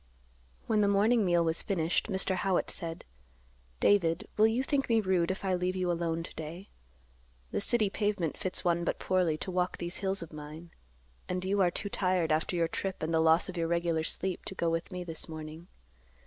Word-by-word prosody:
When 215 -2 +2
the 205 - +4
morning 210 +3 +4
meal 175 -2 +3
was 165 0 0
finished, 170 -4 0
Mr. 190 -2 0
Howitt 185 0 +1
said, 165 -1 -4 0.7
"David, 170 -4 +3
will 215 +1 +6
you 235 +4 +1
think 275 -1 0
me 225 -1 +4
rude, 185 -4 +1
if 190 +1 -3
I 190 - +1
leave 180 +1 0
you 180 -1 0
alone 165 -1 -1
to - - -8
day? 165 +5 -7 0.8
The - - -1
city 220 0 +3
pavement 205 -7 0
fits 185 -1 -3
one 170 0 +2
but - - -1
poorly 180 -4 +1
to 185 - -5
walk 180 0 0
these 175 +1 -4
hills 195 -2 -1
of 165 - -12
mine, 155 +3 -9 0.6
and 180 0 -2
you 200 +1 +2
are 180 - +5
too 200 +4 -4
tired 185 -4 +1
after 155 +3 +1
your 170 -1 +2
trip 190 +2 -4
and 160 +1 -1
the 160 - +4
loss 160 +1 +4
of 185 - -6
your 165 -1 0
regular 170 -1 +1
sleep 185 +3 -3
to 190 - -5
go 170 -2 0
with 165 +3 -2
me 180 -1 -4
this 165 -2 -4
morning. 155 +2 -8
180 Hz, 205 wpm, -31 LUFS, 165-195 Hz, 0.8 s, will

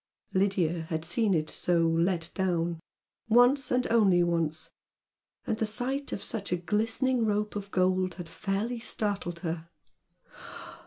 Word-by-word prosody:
Lydia 180 -4 +1
had 160 0 -2
seen 215 0 +2
it 155 -1 0
so 170 +1 +1
"let 165 +1 0
down," 175 -3 -1 0.5
once, 245 +4 +5
and 250 0 +1
only 195 -6 +5
once, 165 -2 -1 0.7
and 220 - -2
the 220 - +1
sight 260 +6 -1
of - - -4
such 210 -6 -4
a 180 - +2
glistening 225 +7 0
rope 210 -1 0
of 200 -1 -5
gold 185 -1 +1
had 175 -1 -7
fairly 200 +7 -2
startled 200 -7 -2
her. 165 -1 -4
190 Hz, 140 wpm, -29 LUFS, 170-220 Hz, 0.7 s, once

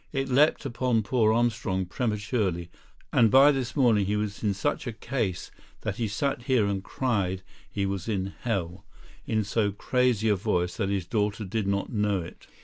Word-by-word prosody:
It 135 -1 -2
leapt 145 +3 +3
upon 120 -3 0
poor 110 0 +2
Armstrong 110 -5 0
prematurely, 105 -4 -2 0.4
and 115 -2 +5
by 135 +5 +7
this 130 -4 -3
morning 115 -8 +3
he 105 - 0
was 105 -1 -3
in 100 -2 +1
such 100 - -2
a 120 - -3
case 110 -6 -3 0.3
that - - -3
he 115 - -1
sat 120 +5 -1
here 130 -6 +3
and 100 -1 -2
cried 100 -9 -1 0.3
he 100 -1 -2
was 95 +1 -3
in 95 -2 -2
hell, 95 -6 -2 0.4
in 110 -1 +1
so 105 0 0
crazy 120 +1 +1
a 105 - +4
voice 90 -3 -1
that 100 -3 -1
his 100 -3 -1
daughter 105 +2 -1
did 100 +1 -2
not 100 +4 -1
know 105 -2 +1
it. 85 - -10
105 Hz, 180 wpm, -27 LUFS, 95-120 Hz, 0.4 s, by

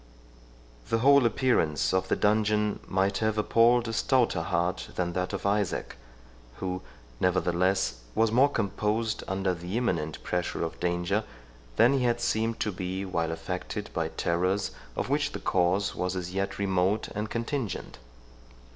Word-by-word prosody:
The - - +2
whole 140 +1 +6
appearance 105 - +1
of 95 0 +1
the - - +2
dungeon 105 0 +2
might 95 +1 +1
have 110 -1 0
appalled 115 +2 +4
a 115 - -3
stouter 120 -6 +2
heart 85 +1 -1
than 85 -1 -1
that 90 +1 -1
of - - -4
Isaac, 100 -2 0 0.6
who, 90 +3 -3 0.4
nevertheless, 90 -5 +1 0.2
was 110 -1 +3
more 130 +5 +5
composed 110 -1 -1
under 95 0 0
the 90 +5 -4
imminent 85 -11 -1
pressure 90 -1 -2
of 80 - -5
danger, 90 +4 0 0.5
than 120 - +5
he 135 -2 +1
had 120 -1 +2
seemed 115 0 0
to 105 - 0
be 95 +1 -4
while 85 -3 -1
affected 90 +2 -5
by - - 0
terrors, 90 +4 0 0.2
of - - -2
which 145 +2 0
the - - -4
cause 95 +2 +1
was 90 0 -2
as 90 0 -4
yet 95 0 -2
remote 95 +1 +1
and 105 +1 -4
contingent. 115 - -3
95 Hz, 150 wpm, -28 LUFS, 90-115 Hz, 0.6 s, whole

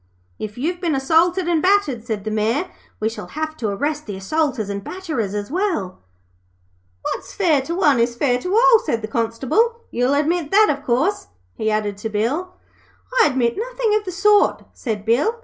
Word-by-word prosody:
'If 210 +1 -6
you've 345 +7 -2
been 330 -5 0
assaulted 335 +6 +2
and 335 -3 +2
battered,' 365 - +2
said 215 -4 -3
the 215 - -3
Mayor, 225 - 0 0.3
'we 215 - 0
shall 225 - -6
have 315 +1 -4
to 225 - -2
arrest 290 +9 -2
the 205 - -4
assaulters 260 +1 -1
and 200 0 -4
batterers, 290 - -4
as 205 +4 -4
well.' 335 - -1 1.0
'What's - - -4
fair 325 -8 +3
to 330 +6 -4
one 295 -9 +3
is 235 +1 +1
fair 250 -1 +1
to 365 +8 -2
all,' 460 0 +6
said 230 - -2
the - - -2
Constable. 260 - 0
'You'll 250 +3 +1
admit 310 +2 0
that, 425 +4 +5
of 280 - -15
course?' 300 +11 0 0.3
he 220 - -1
added 210 -2 -1
to 220 - -4
Bill. 260 - -2 0.7
'I - - +6
admit 250 -4 0
nothin' - - -1
of 425 0 +2
the 370 - -4
sort,' 410 +3 +3
said 215 -5 -4
Bill. 265 - +2
285 Hz, 185 wpm, -21 LUFS, 225-365 Hz, 1.0 s, all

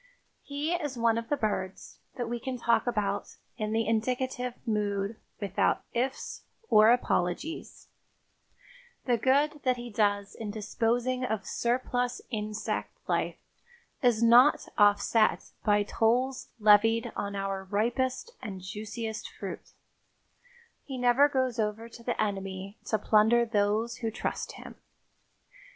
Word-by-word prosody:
He 290 +4 -2
is 295 -7 -2
one 230 -1 +3
of 230 - -8
the 290 - +1
birds 195 -5 -3 0.2
that 245 -3 -3
we 240 +1 -3
can 260 +1 -4
talk 235 0 +2
about 205 -4 -1 0.2
in 215 -2 -2
the 225 0 +1
indicative 250 +2 -1
mood 205 -1 -1 0.2
without 200 -2 +1
"ifs" 255 +3 -2 0.3
or 215 +1 +7
apologies; 240 - -1 1.2
the 245 - +3
good 285 +5 +2
that 255 -1 +1
he 240 0 -7
does 205 -1 +1
in 220 -2 -6
disposing 235 +4 -1
of 220 -4 -2
surplus 245 0 -1
insect 215 -1 -3
life - - 0 0.6
is 235 -3 +3
not 245 +5 +6
offset 205 +1 +3
by 205 -1 +3
tolls 245 +5 0
levied 220 +2 +5
on 200 0 -3
our 195 -1 -2
ripest 240 - -1
and 190 -3 -6
juiciest 215 +3 -5
fruit; - - -8 1.1
he 265 -2 -6
never 250 +4 +5
goes 260 -4 0
over 215 +1 -1
to 235 0 -13
the 240 0 -3
enemy 195 -1 -3
to 220 - +1
plunder 220 +3 +4
those 215 +1 0
who 230 - -2
trust 220 - -4
him. - - -11
225 Hz, 130 wpm, -29 LUFS, 210-250 Hz, 1.2 s, or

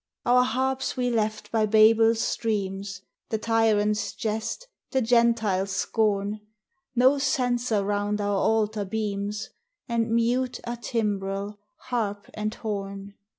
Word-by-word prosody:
Our 250 +1 +5
harps 260 +2 -1
we 245 -1 +1
left 215 -2 -1
by 220 -1 +2
Babel's 225 +1 +5
streams, 195 -3 -2 0.3
The 220 - 0
tyrant's 215 -2 +1
jest, 220 - -3 0.2
the 265 - +1
Gentile's 225 -5 +2
scorn; 205 0 0 0.6
No 260 +3 +5
censer 245 -7 +1
round 205 +1 -1
our 205 -1 0
altar 215 -1 +1
beams, 205 0 -3 0.4
And 230 -2 0
mute 240 +3 +1
are 240 0 -4
timbrel, 205 -3 -2 0.2
harp, 205 -5 -3
and 215 0 -3
horn. 200 -2 -5
220 Hz, 115 wpm, -26 LUFS, 205-235 Hz, 0.6 s, Our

